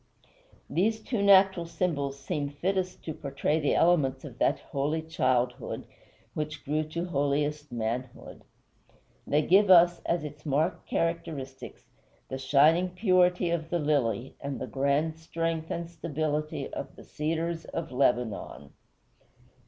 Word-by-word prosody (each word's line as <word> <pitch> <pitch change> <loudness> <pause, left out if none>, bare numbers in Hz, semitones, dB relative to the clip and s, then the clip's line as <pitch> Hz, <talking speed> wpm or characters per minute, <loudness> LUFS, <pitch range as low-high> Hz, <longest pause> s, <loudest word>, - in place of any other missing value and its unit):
These 220 +5 0
two 225 -2 -2
natural 190 -3 +5
symbols 145 -6 -2
seem 140 +1 -3
fittest 185 +5 -2
to 160 - -3
portray 145 +2 -1
the 145 - +1
elements 145 -6 +2
of 125 -4 -10
that - - +3
holy 150 +3 -2
childhood 125 -6 -1 0.5
which 150 -1 -5
grew 150 +2 0
to 170 +3 -4
holiest 145 -2 -1
manhood. 120 +2 -4 0.9
They 150 +1 +2
give 195 +5 +5
us, 175 -1 +7
as 170 -2 0
its 150 0 -8
marked 155 +5 0
characteristics, 160 -6 -3 0.5
the 130 - -4
shining 150 +7 +4
purity 180 -2 +2
of 165 -2 -2
the 175 - +1
lily 135 -5 0
and 140 -1 -4
the - - -3
grand 140 +4 0
strength 165 0 -3
and 170 0 -3
stability 155 -2 -3
of - - -6
the - - -13
cedars 165 +2 -3
of 165 - -5
Lebanon. 120 - -1
155 Hz, 130 wpm, -28 LUFS, 140-170 Hz, 0.9 s, us